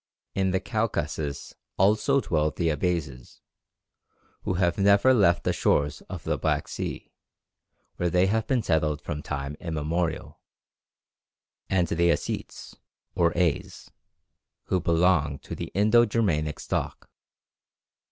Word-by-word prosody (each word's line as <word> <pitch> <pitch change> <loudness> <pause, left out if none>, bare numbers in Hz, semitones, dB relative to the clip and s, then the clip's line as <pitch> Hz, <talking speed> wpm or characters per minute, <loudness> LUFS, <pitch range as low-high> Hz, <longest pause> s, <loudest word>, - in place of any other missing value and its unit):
In 95 -1 +1
the 95 0 +1
Caucasus 80 - -3 0.2
also 110 +8 +3
dwell 75 -6 +1
the 85 +2 -1
Abazes 75 -5 -3 1.0
who 95 - -2
have 85 0 +1
never 100 +6 +5
left 100 -8 +3
the - - +1
shores 75 +1 +1
of - - -7
the - - -1
Black - - 0
Sea, - - -5 0.9
where 90 - 0
they 90 +2 +3
have 110 +3 0
been 130 -4 +1
settled 75 -4 0
from 75 - -4
time 70 -1 -4
immemorial 80 +1 -3 1.3
and 90 -2 +2
the 85 +1 +2
Ossetes, - - -4 0.4
or 85 -1 +2
As, 85 -4 -1 0.7
who 95 - 0
belong 85 -4 +2
to - - -9
the - - -5
Indo 110 +4 +5
Germanic 85 -10 0
stock. - - -4
85 Hz, 125 wpm, -26 LUFS, 75-100 Hz, 1.3 s, never